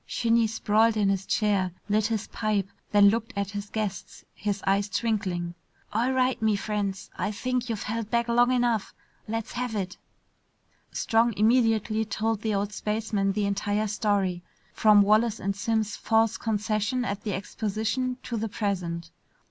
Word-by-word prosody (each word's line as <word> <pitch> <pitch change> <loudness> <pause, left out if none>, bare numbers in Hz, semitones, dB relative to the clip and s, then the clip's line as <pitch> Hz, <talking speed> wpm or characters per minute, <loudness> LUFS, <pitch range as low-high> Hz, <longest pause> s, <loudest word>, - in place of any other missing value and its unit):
Shinny 230 -1 +2
sprawled 220 +1 +2
in 205 -2 +3
his 195 -1 -1
chair, 200 -4 +1 0.2
lit 215 0 +2
his 225 -2 -2
pipe, 210 -3 -1 0.2
then 205 -1 +7
looked 230 +3 -2
at 200 -1 -2
his 205 0 -5
guests, 210 -3 -4
his 205 -1 -3
eyes 200 +1 +2
twinkling. 195 -6 -1 0.4
"All 235 +5 +1
right, 260 -1 +1
me 220 -1 +3
friends, 200 -2 -3
I 195 - 0
think 250 +3 -2
you've 220 -3 -2
held 225 0 -3
back 235 0 +1
long 240 +1 +4
enough. 240 -4 +1 0.3
Let's 225 +1 -3
have 245 -2 -3
it." 185 -3 -3 0.9
Strong 230 -1 +2
immediately 220 -1 +3
told 220 0 -1
the 220 -2 0
old 200 +1 -1
spaceman 210 -2 -1
the 210 0 0
entire 205 +1 0
story, 200 -4 0 0.3
from 210 -2 +6
Wallace 215 +2 +3
and 200 +1 -2
Simms' 215 0 -1
false 225 0 +2
concession 215 +2 -1
at 200 -3 -3
the 205 -2 -3
exposition 220 +5 -2
to 235 - -3
the 220 0 -2
present. 175 -6 -3
215 Hz, 155 wpm, -27 LUFS, 200-225 Hz, 0.9 s, then